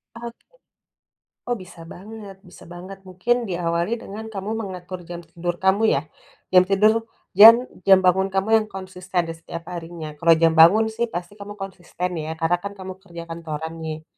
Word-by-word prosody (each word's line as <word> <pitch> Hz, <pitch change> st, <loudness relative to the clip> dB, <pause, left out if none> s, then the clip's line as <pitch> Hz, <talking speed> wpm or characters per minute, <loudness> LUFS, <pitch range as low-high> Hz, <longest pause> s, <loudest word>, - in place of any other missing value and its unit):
Oke. 235 Hz, 0 st, -10 dB, 1.0 s
Oh, 245 Hz, -, 0 dB
bisa 180 Hz, -3 st, -13 dB
banget, 205 Hz, 0 st, -10 dB
bisa 180 Hz, -, -15 dB
banget. 185 Hz, +3 st, -10 dB
Mungkin, 235 Hz, +5 st, -1 dB
diawali 175 Hz, +4 st, -1 dB
dengan, 220 Hz, 0 st, -8 dB
kamu 205 Hz, -1 st, -6 dB
mengatur 185 Hz, -2 st, -7 dB
jam 175 Hz, -1 st, -7 dB
tidur 175 Hz, +1 st, -4 dB
kamu, 190 Hz, +4 st, +2 dB
ya. -, -, 0 dB, 0.5 s
Jam 185 Hz, -1 st, +8 dB
tidur, 215 Hz, +3 st, +3 dB, 0.2 s
dan 215 Hz, +4 st, +10 dB, 0.3 s
jam 190 Hz, -1 st, +8 dB
bangun 190 Hz, +1 st, +3 dB
kamu 195 Hz, +2 st, -1 dB
yang 215 Hz, -, -5 dB
konsisten, 185 Hz, -2 st, -4 dB
di 165 Hz, -, -5 dB
setiap 165 Hz, 0 st, -9 dB
harinya. 165 Hz, -2 st, -7 dB
Kalau 165 Hz, -1 st, +5 dB
jam 165 Hz, 0 st, +3 dB
bangun, 195 Hz, +8 st, +6 dB
sih, 235 Hz, +1 st, -2 dB
pasti 175 Hz, -1 st, -6 dB
kamu 205 Hz, +1 st, -8 dB
konsisten, 180 Hz, -2 st, -5 dB
ya. 160 Hz, +1 st, -5 dB
Karena, 165 Hz, +2 st, +1 dB
kan, 200 Hz, +1 st, -7 dB
kamu 190 Hz, -1 st, -7 dB
kerja 170 Hz, -3 st, -10 dB
kantoran, 160 Hz, -1 st, -6 dB
nih. 155 Hz, 0 st, -6 dB
185 Hz, 170 wpm, -22 LUFS, 170-200 Hz, 1.0 s, dan